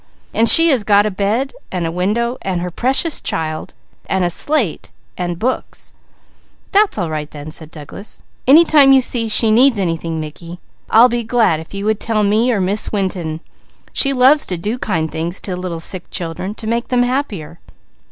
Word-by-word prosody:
And 225 +2 +3
she 330 0 +7
has 260 -8 +2
got 205 0 +4
a 215 - -1
bed, 210 +8 -1 0.2
and 180 -2 -2
a 165 - -2
window, 220 +8 -1
and 185 -2 -2
her 180 0 -4
Precious 265 - +1
Child, 155 -1 -4 0.3
and 190 -1 0
a 175 - 0
slate, 260 - -1 0.3
and 175 -1 -3
books." 250 +7 -4 0.8
"That's 410 - +3
all 175 -5 -2
right 150 -1 -4
then," 150 0 -9
said 160 -1 -7
Douglas. 155 +6 -10 0.2
"Any 315 +6 +7
time 285 -4 +6
you 265 - +6
see 235 -2 -1
she 220 +1 +4
needs 245 +2 +5
anything 165 -3 -2
Mickey, 165 +3 -8 0.3
I'd 235 +2 +6
be 240 0 -1
glad 220 -8 +1
if 160 +4 -11
you 200 +1 -4
would 215 0 0
tell 220 -2 0
me 215 +5 +2
or 220 - 0
Miss 195 +3 -1
Winton. 180 -6 -3 0.5
She 275 - +1
loves 270 +3 +4
to 180 - -3
do 210 +8 -3
kind 165 -9 -2
things 170 +3 -4
to 185 - -4
little 180 -2 -5
sick 180 +2 -5
children 180 +4 -5
to 225 - -9
make 235 +2 -1
them 245 -1 +2
happier." 235 - -3
200 Hz, 190 wpm, -17 LUFS, 170-245 Hz, 0.8 s, she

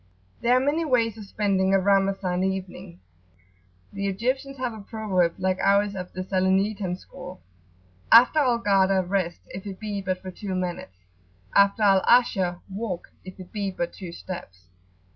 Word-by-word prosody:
There 245 +2 +4
are - - +4
many 290 +5 0
ways 235 -7 +1
of 210 - -8
spending 195 -2 +1
a - - +4
Ramazan 195 -2 +1
evening. 190 - -4 0.9
The 200 0 -2
Egyptians 260 +7 -2
have 250 -2 -3
a 220 - -9
proverb, 200 -5 0
like 185 0 0
ours 200 +1 +3
of 180 -1 -6
the 185 - -5
Salernitan 190 0 0
school: 185 -1 -11 0.7
[p.80]"After 250 +7 +7
Al 250 -5 +2
Ghada 195 -2 +3
rest, 180 -3 -1
if 190 +2 -8
it 190 -1 -7
be 210 -2 -4
but 185 -1 -2
for 185 0 -8
two 190 0 -5
moments: 175 - -4 0.6
After 200 +2 +4
Al 195 -2 +5
Asha[FN#10] 190 -7 +3
walk, 190 -3 -5
if 185 +1 -11
it 185 -1 -11
be 205 -2 -2
but 175 -2 -4
two 185 -4 -8
steps." 135 - -9
195 Hz, 160 wpm, -25 LUFS, 185-215 Hz, 0.9 s, p.80]"After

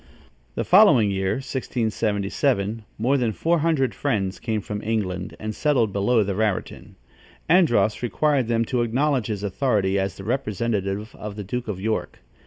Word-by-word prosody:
The - - -1
following 105 -4 +6
year 95 0 0
(1677), 110 -3 -1 0.2
more 130 +6 +2
than 120 -4 0
four 165 +9 +1
hundred 145 -7 +1
Friends 95 -2 -1
came 110 -2 -2
from 105 +1 -5
England 95 -5 -2
and 110 0 -4
settled 125 -9 +1
below 110 +3 +2
the 100 0 -2
Raritan. 105 -1 -2 0.5
Andros 120 - +3
required 135 +1 +1
them 115 0 +1
to 125 +1 0
acknowledge 130 +1 +1
his 105 -2 -4
authority 100 -2 +1
as 95 0 -2
the - - -8
representative 105 -3 -2
of 105 -1 -7
the 105 - -5
Duke 120 +5 -4
of 100 -4 -4
York. 110 +3 -2
110 Hz, 155 wpm, -23 LUFS, 100-125 Hz, 0.5 s, following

